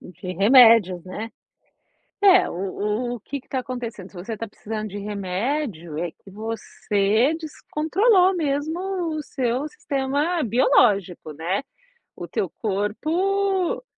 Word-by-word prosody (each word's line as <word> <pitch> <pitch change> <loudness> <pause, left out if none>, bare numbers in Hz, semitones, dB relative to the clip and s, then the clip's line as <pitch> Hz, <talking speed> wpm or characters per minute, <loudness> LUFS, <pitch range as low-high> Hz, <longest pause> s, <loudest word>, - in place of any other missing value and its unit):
De 180 +1 -8
remédios, 220 -5 +6
né. 215 +5 -6 0.9
É, 380 -2 +6
o 210 +6 -2
o - - -9
que 280 +3 -5
que - - -33
tá 260 - -1
acontecendo, 240 -7 -6
se - - -21
você 215 +5 -5
tá 230 - -5
precisando 215 +1 -6
de 205 - -7
remédio 200 - -3
é 175 -1 -2
que 195 - -18
você 215 +3 0
descontrolou 365 +5 +2
mesmo 300 +1 -1 0.4
o 305 - -3
seu 260 +1 -2
sistema 290 +4 -1
biológico, 200 - +2
né. 170 - -2 0.5
O - - -7
teu - - -2
corpo 350 - 0
230 Hz, 125 wpm, -23 LUFS, 200-295 Hz, 0.9 s, remédios